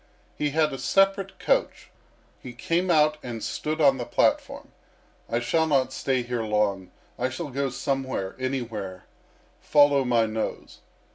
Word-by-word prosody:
He 150 Hz, -, -1 dB
had 155 Hz, 0 st, +1 dB
a 135 Hz, -, -5 dB
separate 195 Hz, +5 st, +1 dB
coach. -, -, -1 dB, 0.5 s
He 125 Hz, -, -9 dB
came 175 Hz, +8 st, -1 dB
out 155 Hz, -2 st, +3 dB
and 115 Hz, -3 st, -6 dB
stood 155 Hz, +1 st, -3 dB
on 140 Hz, -3 st, +5 dB
the 125 Hz, -, -3 dB
platform... -, -, 0 dB, 0.6 s
I 115 Hz, -, 0 dB
shall 160 Hz, +7 st, +1 dB
not 130 Hz, -3 st, +1 dB
stay 130 Hz, -2 st, -1 dB
here 120 Hz, -1 st, -3 dB
long; 105 Hz, -4 st, 0 dB, 0.3 s
I 125 Hz, +1 st, 0 dB
shall 145 Hz, +4 st, -5 dB
go 140 Hz, +1 st, -1 dB
somewhere, 130 Hz, -7 st, -3 dB
anywhere, 115 Hz, -8 st, -4 dB, 0.5 s
follow 145 Hz, -2 st, +4 dB
my 120 Hz, -3 st, +2 dB
nose." 110 Hz, 0 st, -5 dB
130 Hz, 145 wpm, -25 LUFS, 120-150 Hz, 0.6 s, on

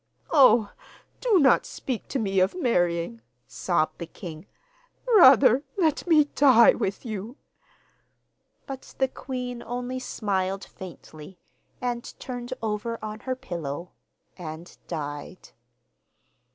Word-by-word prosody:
'Oh, 240 Hz, -7 st, +6 dB, 0.5 s
do 470 Hz, -6 st, +3 dB
not 275 Hz, -6 st, +5 dB
speak 250 Hz, -5 st, -5 dB
to -, -, -2 dB
me 195 Hz, -5 st, 0 dB
of 185 Hz, +2 st, +2 dB
marrying,' 170 Hz, -, 0 dB, 0.2 s
sobbed 175 Hz, -4 st, -1 dB
the 170 Hz, -, -5 dB
king; 165 Hz, -1 st, -10 dB, 0.6 s
'rather 270 Hz, -, +7 dB, 0.2 s
let 325 Hz, -2 st, +1 dB
me 315 Hz, -3 st, +6 dB
die 265 Hz, -5 st, +6 dB
with 200 Hz, +1 st, -3 dB
you!' 220 Hz, +4 st, -6 dB, 1.3 s
But 270 Hz, -1 st, -9 dB
the 265 Hz, -, +2 dB
queen 250 Hz, -2 st, -6 dB
only 245 Hz, +2 st, -4 dB
smiled 195 Hz, -5 st, -2 dB
faintly, 175 Hz, -2 st, -12 dB, 0.4 s
and 240 Hz, -1 st, -3 dB
turned 245 Hz, -1 st, -6 dB
over 220 Hz, +2 st, -2 dB
on 215 Hz, 0 st, -6 dB
her 255 Hz, +2 st, -3 dB
pillow 170 Hz, -, -6 dB, 0.4 s
and 165 Hz, 0 st, -9 dB
died. 145 Hz, +4 st, -6 dB
225 Hz, 110 wpm, -26 LUFS, 185-255 Hz, 1.3 s, rather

